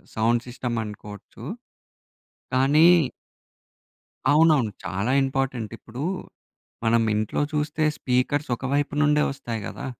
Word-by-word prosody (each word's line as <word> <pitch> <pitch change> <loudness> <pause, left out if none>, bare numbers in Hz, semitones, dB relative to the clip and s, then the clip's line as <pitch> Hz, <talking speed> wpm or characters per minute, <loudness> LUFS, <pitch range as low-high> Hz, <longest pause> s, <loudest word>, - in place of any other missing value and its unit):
Sound 115 +2 +2
system 120 -1 -4
అనుకోవచ్చు, 105 -1 -10 1.1
కానీ 140 +5 +5 1.4
అవునవును. 150 -7 +4
చాలా 100 +7 -1
ఇంపార్టెంట్. 135 -4 -2
ఇప్పుడు 120 +3 -9 0.8
మనం 115 0 +3
ఇంట్లో 105 0 -1
చూస్తే 150 +1 -1 0.2
స్పీకర్స్ 130 +3 0
ఒకవైపు 140 +4 -1
నుండే 150 0 +4
వస్తాయి 120 -4 -5
గదా. - - -6
130 Hz, 95 wpm, -24 LUFS, 115-145 Hz, 1.4 s, కానీ